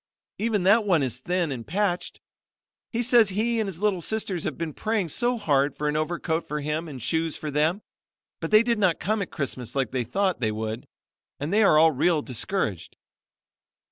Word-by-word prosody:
Even 215 -3 0
that 210 +4 +5
one 175 -8 +2
is 125 -2 -2
thin 175 +2 -1
and 120 -4 -6
patched. 185 +1 -1 0.7
He 240 +1 -1
says 235 -3 +5
he 225 +4 0
and 220 - 0
his 190 -4 -5
little 205 -3 +1
sisters 195 -3 -2
have 155 - -3
been 165 -2 -4
praying 215 -3 -1
so 240 +9 +1
hard 145 -8 +1
for 150 - -1
an 150 - 0
overcoat 160 +1 -1
for 150 +1 -3
him 150 +3 -3
and 140 -4 -8
shoes 160 +6 0
for 150 - -5
them, 155 +8 +1 0.6
but - - -4
they 215 +1 +6
did 235 -2 0
not 185 -5 +2
come 215 +1 0
at 180 - -4
Christmas 130 -4 -4
like 135 -4 0
they 130 -2 -1
thought 190 - 0
they 110 -3 0
would, 110 +2 -4 0.5
and 150 +6 -3
they 215 - +4
are 160 -5 +6
real 155 +3 +2
discouraged. 120 - -3
170 Hz, 195 wpm, -25 LUFS, 145-205 Hz, 0.7 s, they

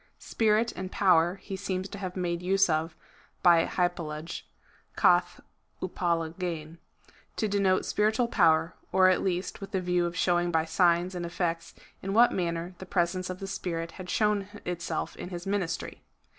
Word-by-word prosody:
Spirit 225 +1 +1
and 185 0 -6
power 175 -2 +3
he 195 - -5
seems 190 -1 -3
to 200 - -8
have 185 -2 -5
made 175 -2 -2
use 190 0 +3
of 160 +1 -1 0.5
by 170 -2 +6
hypal 175 -2 -1
lage,^ 155 +2 -6 0.5
(«a^' - - +3 0.4
vTraWayrjv,) 170 -2 -2 0.6
to 215 - 0
denote 200 -2 +2
spiritual 220 +3 +1
poiuer, 165 -6 +3 0.2
or 185 0 +5
at 185 - +2
least 185 +1 -2
with 195 - -6
the 195 -2 -1
view 180 -1 +1
of 170 +1 -6
showing 175 -1 +2
by 160 -2 +1
signs 175 +2 +2
and 175 -1 -4
effects 170 -1 -3 0.3
in 195 +1 -3
what 235 +2 +6
manner 170 0 -2
the 190 - -7
presence 180 0 0
of 185 - -4
the 195 - -5
Spirit 170 -3 -4
had 185 -2 -9
shown 210 -2 +1 0.2
itself 175 -1 -3
in - - -6
his 175 -1 -6
ministry. 195 -4 -3
180 Hz, 165 wpm, -28 LUFS, 170-195 Hz, 0.6 s, by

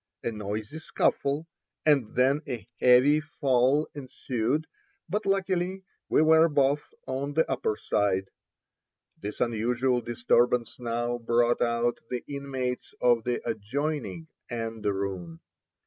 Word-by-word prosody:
A 115 - -1
noisy 105 +6 -5
scuffle, 145 -1 0 0.4
and 140 -8 +3
then 135 +4 +3
a 115 -6 -5
heavy 125 +4 +6
fall 140 -1 +2
ensued, 130 0 -2 0.4
but 210 0 -2
luckily 190 -1 0 0.3
we - - +4
were 160 +1 +6
both 145 0 +1
on 140 +2 -3
the 160 - +3
upper 125 -5 -1
side. 95 -1 0 0.9
This 105 +1 -6
unusual 120 +2 +1
disturbance 120 +1 +1
now 120 0 -2
brought 120 +1 +2
out 120 0 +1
the 125 -1 -3
inmates 135 -3 -4
of 120 -2 +3
the 120 -1 -2
adjoining 145 +8 -3 0.2
anderoon. 100 -7 -3
125 Hz, 115 wpm, -28 LUFS, 115-145 Hz, 0.9 s, heavy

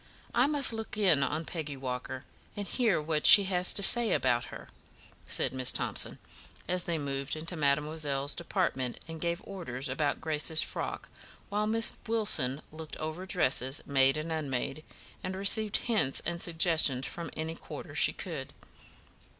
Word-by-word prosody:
I 245 +3 +3
must 285 -5 +5
look 220 -1 -6
in 185 -9 +3
on 155 +4 -2
Peggy 150 -5 -6
Walker, 130 0 -6 0.3
and 205 -1 -5
hear 230 -9 0
what 150 0 +1
she 200 +1 +9
says 185 +2 +5
about 125 - 0
her," - - -11 0.6
said - - +2
Miss 130 -1 +3
Thomson, - - +1 0.5
as 180 0 -1
they 170 -1 -2
moved 140 -1 -4
into 165 +3 -4
mademoiselle's 145 -1 -1
department 170 -8 -2
and 165 -1 -8
gave 170 +1 -3
orders 150 -10 -5
about 145 +2 -1
Grace's 155 0 0
frock, - - -5 0.4
while 210 +1 -1
Miss 225 +1 +3
Wilson 195 - +1
looked 155 0 -9
over 160 +4 -6
dresses, 135 -6 +1
made 135 0 +2
and 155 +2 -5
unmade, 140 -1 -4 0.4
and 185 +1 -4
received 205 +2 +1
hints 215 - +2
and 170 +1 -4
suggestions 160 -6 +3
from 170 - -5
any 160 +1 -4
quarter - - -10
she - - +3
could. - - -7
160 Hz, 150 wpm, -29 LUFS, 140-190 Hz, 0.6 s, she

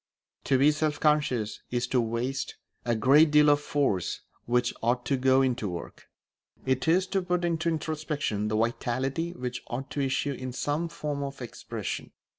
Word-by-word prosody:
To 135 - +3
be 140 +3 +5
self 150 0 -1
conscious 145 -8 +1
is 120 0 0
to 125 - +3
waste 120 +4 -2 0.3
a 120 -1 +1
great 140 +8 +6
deal 150 0 +6
of 145 - +4
force 135 -13 0 0.3
which 120 +1 +2
ought 120 +1 +1
to 135 - +1
go 130 +1 +4
into 125 -5 0
work; 85 -1 -8 0.6
it 130 +2 0
is 180 +3 +4
to 195 -1 +1
put 180 -1 0
into 170 -1 0
introspection 155 -9 -2
the 110 0 0
vitality 130 +8 -1
which 125 -5 -5
ought 130 +3 -5
to 145 - -1
issue 135 +1 0
in 130 -1 -6
some 150 +6 -1
form 150 -3 -4
of 140 0 -5
expression. 120 -2 -6
135 Hz, 170 wpm, -28 LUFS, 120-150 Hz, 0.6 s, great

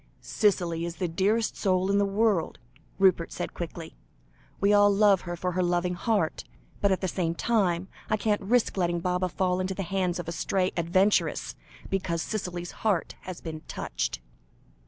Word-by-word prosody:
"Cicely 175 -5 +1
is 170 0 -4
the 180 - -2
dearest 205 +7 +1
soul 185 0 +1
in 200 - +3
the 200 - +3
world," 200 -4 +1 0.4
Rupert 185 -3 +3
said - - -4
quickly. - - -7 0.6
"We 200 +1 +3
all 205 0 +6
love 200 -2 +4
her 175 -1 -5
for 180 +1 -2
her 185 +1 0
loving 175 0 +1
heart 195 -2 0 0.4
but 200 - +3
at 190 - +1
the 190 - 0
same 170 -2 -1
time, 185 -5 +1 0.2
I 215 - +2
can't 210 -1 0
risk 220 +2 +1
letting 175 -2 +1
Baba 180 +1 0
fall 180 0 0
into 185 +1 -2
the 195 - -3
hands 180 -1 -1
of 175 -2 -5
a - - -2
stray 185 +3 0
adventuress, 185 +4 +2 0.4
because 175 -4 -1
Cicely's 180 -5 -4
heart 205 -7 -1
has 185 -2 -7
been 160 -2 -6
touched." - - -3
185 Hz, 175 wpm, -27 LUFS, 175-200 Hz, 0.6 s, all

